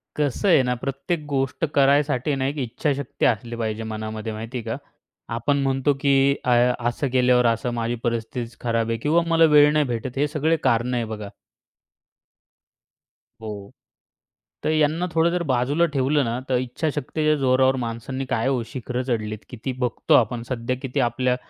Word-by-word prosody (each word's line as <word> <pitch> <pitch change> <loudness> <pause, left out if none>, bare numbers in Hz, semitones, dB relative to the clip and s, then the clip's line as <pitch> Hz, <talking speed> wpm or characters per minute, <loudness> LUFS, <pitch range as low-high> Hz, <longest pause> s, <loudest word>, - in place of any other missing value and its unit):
कसं 150 - 0
आहे 150 - +6
ना, 125 0 0
प्रत्येक 140 +6 -3
गोष्ट 135 +2 -1
करायसाठी 140 0 +3
ना 130 -1 -1
एक 145 +2 -3
इच्छाशक्ती 140 +1 -2
असली 120 +1 0
पाहिजे 110 -1 -3
मनामध्ये 110 0 -5
माहिती 115 +4 -6
आहे 120 - -5
का 115 0 -3 0.6
आपण 140 +5 +1
म्हणतो, 135 +1 +1
की 140 0 +4
अ, 125 - +1 0.4
असं 130 +4 -2
केल्यावर 125 -1 +4
असं, 115 +1 +1
माझी 115 0 -1
परिस्थितीच 115 0 -3
खराब 115 -1 -1
आहे 115 - 0
किंवा 150 +8 +2
मला 165 0 +4
वेळ 145 0 +7
नाही 150 -1 +3
भेटत. 120 +1 -4
हे 145 - +2
सगळे 155 +2 +1
कारणं 120 +2 +1
आहे 115 - -1
बघा. 105 -2 -6 2.1
हो. 105 -2 -7 0.9
तर - - +1
यांना 155 +3 +2
थोडं 165 +1 +3
जर 175 -1 -1
बाजूला 130 +7 +2
ठेवलं 140 +2 +2
ना, 115 +1 -2
तर 130 - +3
इच्छाशक्तीच्या 150 +4 -1
जोरावर 130 0 +3
माणसांनी 115 +4 -4
काय 120 -2 0
हो 130 -3 +1
शिखरं 125 0 -4
चढली 110 -3 -1
किती, 125 +2 -5
बघतो 125 -2 0
आपण. 120 0 +2
सध्या 125 0 -2
किती 135 +1 -3
आपल्या 125 +1 +1
130 Hz, 160 wpm, -23 LUFS, 115-145 Hz, 2.1 s, वेळ